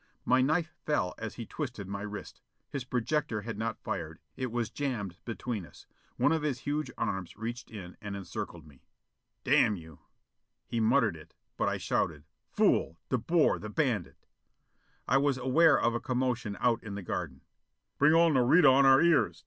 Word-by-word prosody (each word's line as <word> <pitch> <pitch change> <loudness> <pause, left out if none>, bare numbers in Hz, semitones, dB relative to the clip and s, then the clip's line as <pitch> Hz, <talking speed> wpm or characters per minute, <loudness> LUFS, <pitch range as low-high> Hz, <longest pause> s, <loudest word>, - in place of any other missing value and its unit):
My 130 +1 +4
knife 160 +4 +1
fell 100 -12 0
as 110 0 -5
he 115 - -6
twisted 120 - -5
my 100 0 -5
wrist. 105 0 -7 0.3
His 140 -4 -3
projector 125 -2 -1
had 115 0 -5
not 110 +1 -4
fired. - - -4 0.2
It 130 -2 -3
was 120 -2 -2
jammed 115 -12 -3
between 115 -2 -4
us. - - -15 0.3
One - - +3
of 160 -1 +1
his 145 -5 -2
huge 150 +1 -2
arms 95 -2 -3
reached 120 +2 -5
in 95 -5 -9
and 100 -1 -5
encircled 85 -4 -6
me. 70 -4 -18 0.6
"Damn 105 - +4
you!" 80 -4 -12 0.7
He 115 - -2
muttered 115 -3 +3
it, 80 - -14 0.2
but - - +1
I - - -1
shouted, 75 -2 -1 0.3
"Fool! 80 - +2
De 125 - +1
Boer, 165 +5 +2
the 110 - -7
bandit!" 115 - -1 0.8
I - - +4
was 140 -1 +2
aware 145 +5 +4
of 115 - +2
a 120 - -1
commotion 125 -4 -1
out 120 -1 +2
in 100 -3 -7
the 100 - -6
garden. 80 -7 -4 0.3
"... - - -54
Bring 150 +2 +6
all 165 0 +5
Nareda 135 +3 +6
on 135 +1 +5
our 135 +3 +7
ears? 140 - +3
120 Hz, 180 wpm, -30 LUFS, 100-140 Hz, 0.8 s, our